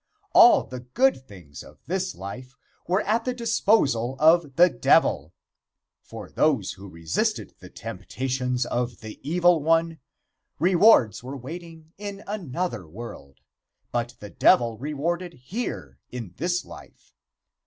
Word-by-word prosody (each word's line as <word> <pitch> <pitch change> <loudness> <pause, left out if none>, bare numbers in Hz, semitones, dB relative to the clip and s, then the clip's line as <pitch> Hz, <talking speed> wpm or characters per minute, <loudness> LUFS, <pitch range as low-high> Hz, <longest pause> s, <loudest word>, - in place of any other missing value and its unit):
All 350 -4 +7
the 125 - -8
good 130 - 0
things 85 - -12
of - - -15
this 185 +3 -2
life 125 +7 -9 0.3
were 185 +4 +1
at 225 +3 0
the 250 0 -2
disposal 205 - +1
of 155 -1 +4
the 175 +2 +7
Devil. 80 - +2 0.7
For - - -10
those - - +1
who 100 +1 -11
resisted 85 -1 -2
the - - -12
temptations 125 -1 -3
of 120 0 -3
the 110 -1 -9
Evil 175 +2 +3
One, 165 +1 +1 0.6
rewards 175 - +4
were 135 +3 -6
waiting 165 +4 -10
in 205 -1 -7
another 175 - -4
world, 80 - -10 0.5
but 120 0 -2
the 105 - -10
Devil 115 -2 +3
rewarded 165 +5 -3
here 125 - -6
in 115 -8 -7
this 175 +3 -1
life. - - -15
145 Hz, 130 wpm, -25 LUFS, 120-180 Hz, 0.7 s, All